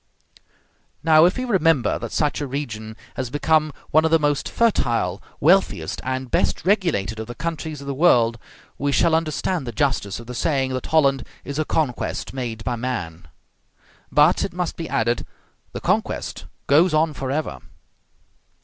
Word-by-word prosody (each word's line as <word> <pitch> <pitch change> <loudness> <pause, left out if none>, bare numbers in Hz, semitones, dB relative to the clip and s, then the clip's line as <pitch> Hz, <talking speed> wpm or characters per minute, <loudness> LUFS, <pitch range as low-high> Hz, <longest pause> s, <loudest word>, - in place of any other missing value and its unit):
Now, 160 0 +6
if 180 - +2
we 255 - -2
remember 165 - +2
that - - -6
such 150 -1 0
a 145 - -2
region 110 -5 -5 0.2
has 130 -2 -3
become 155 +2 +2 0.2
one 155 +1 +5
of 160 - +2
the 165 - +5
most 145 -2 0
fertile, 120 - +1 0.2
wealthiest, 185 +6 +2
and 130 -1 -3
best - - 0
regulated 170 - +1
of 110 - -5
the 120 - -7
countries 160 -3 -4
of - - -9
the 140 - -3
world, 120 -7 +3 0.4
we 145 0 0
shall 165 +3 +3
understand 160 -1 -1
the - - -3
justice 115 -5 -1
of 115 - -10
the 125 - -7
saying 135 -1 0
that 130 - -4
Holland 140 -4 +3 0.2
is 140 +1 -5
a 155 - +1
conquest 145 -6 -2
made 120 -4 -4
by 125 - -1
man. 90 -10 -4 0.8
But, 150 +4 +4
it 195 - -3
must 180 -1 -2
be 165 - -6
added, 120 +1 0 0.5
the - - -5
conquest - - -1 0.2
goes 155 +4 +4
on 155 0 +2
forever. 135 +3 -3
140 Hz, 165 wpm, -22 LUFS, 120-160 Hz, 0.8 s, Now